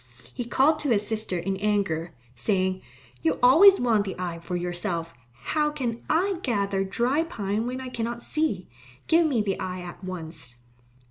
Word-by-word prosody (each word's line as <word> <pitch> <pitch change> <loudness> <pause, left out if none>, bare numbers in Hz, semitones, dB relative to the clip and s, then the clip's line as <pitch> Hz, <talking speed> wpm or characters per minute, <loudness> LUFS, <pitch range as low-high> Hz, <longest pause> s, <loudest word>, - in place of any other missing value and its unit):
He 245 - -4
called 290 +6 +3
to 295 - -1
his 210 -3 +3
sister 215 -4 -2
in 190 +3 -2
anger, 195 -5 0 0.2
saying, 185 - 0 0.4
"You 160 - +1
always 365 +11 +8
want 225 -4 +3
the 195 -2 -5
eye 175 -2 -4
for 180 +2 -5
yourself. 175 -1 -2 0.3
How 300 - +1
can 245 -6 -3
I 360 +3 +2
gather 200 - 0
dry 240 +10 +1
pine 220 -8 -2
when 255 +1 -3
I 260 -1 -6
cannot 235 0 -4
see? 305 - -1 0.4
Give 330 0 +4
me 245 -8 +1
the 195 -2 -2
eye 185 -1 -4
at 180 +1 -9
once." 160 -8 -6
205 Hz, 170 wpm, -26 LUFS, 180-255 Hz, 0.4 s, always